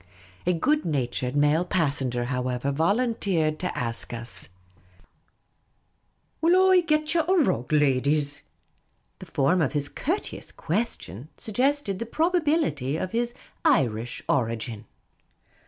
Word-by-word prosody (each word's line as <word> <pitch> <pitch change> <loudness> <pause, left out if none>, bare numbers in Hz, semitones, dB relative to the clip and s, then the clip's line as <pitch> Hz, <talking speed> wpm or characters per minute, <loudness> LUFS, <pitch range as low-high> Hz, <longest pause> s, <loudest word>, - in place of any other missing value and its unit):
A 180 - +4
good 295 - +1
natured 130 -3 -2
male 150 +3 +3
passenger, 140 -9 0
however, 125 +1 -1
volunteered 175 - +1
to 180 - -3
ask 115 -1 -3
us, 120 0 -4 0.9
" - - -45
Will 370 +3 +5
I 370 - +7
get 305 -2 +1
ye 340 - +4
a 330 +4 -2
rug, 280 - +2
ladies?" 145 0 +2 0.8
The - - -10
form 155 +6 +2
of 155 - 0
his 145 -1 -1
courteous 365 +8 -4
question 160 - -3
sug 220 - -6
gested 260 -5 +1
the 230 - -4
probability 305 - +1
of 185 - -3
his 240 +1 -1 0.3
Irish 120 - +1
origin. 115 -3 -1
155 Hz, 120 wpm, -26 LUFS, -, 0.9 s, I